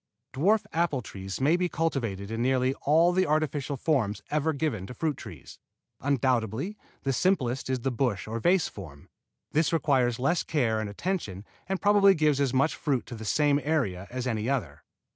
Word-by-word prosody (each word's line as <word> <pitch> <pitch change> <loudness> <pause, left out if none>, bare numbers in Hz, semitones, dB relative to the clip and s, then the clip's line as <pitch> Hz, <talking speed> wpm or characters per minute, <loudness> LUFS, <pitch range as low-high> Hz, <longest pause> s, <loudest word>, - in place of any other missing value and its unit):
Dwarf 200 +10 +2
apple 160 -6 0
trees 95 -1 -7
may 145 +5 +3
be 180 0 0
cultivated 115 - -2
in 115 +1 -2
nearly 130 +1 +2
all 165 +4 +5
the 185 -1 +2
artificial 145 -2 0
forms 115 -9 0
ever 150 +1 +1
given 140 -11 -2
to 125 - -9
fruit 155 0 -1
trees. - - -11 0.4
Undoubtedly 130 - 0 0.3
the 135 - 0
simplest 130 -6 0
is 130 -2 -1
the 135 - -1
bush 120 -5 -1
or 115 +1 -3
vase 175 +6 +3
form. 75 -8 -11 0.4
This 155 +1 +2
requires 135 -7 +2
less 165 +7 +1
care 120 -8 0
and 110 -1 -3
attention 105 - -4 0.2
and 195 -1 -1
probably 200 -1 +5
gives 150 -3 +2
as 135 -3 +2
much 135 +4 +2
fruit 140 -6 -1
to 120 - -8
the 110 0 -8
same 145 +4 +2
area 110 - -1
as 125 0 -4
any 115 -1 -1
other. 85 - -2
135 Hz, 180 wpm, -27 LUFS, 115-160 Hz, 0.4 s, all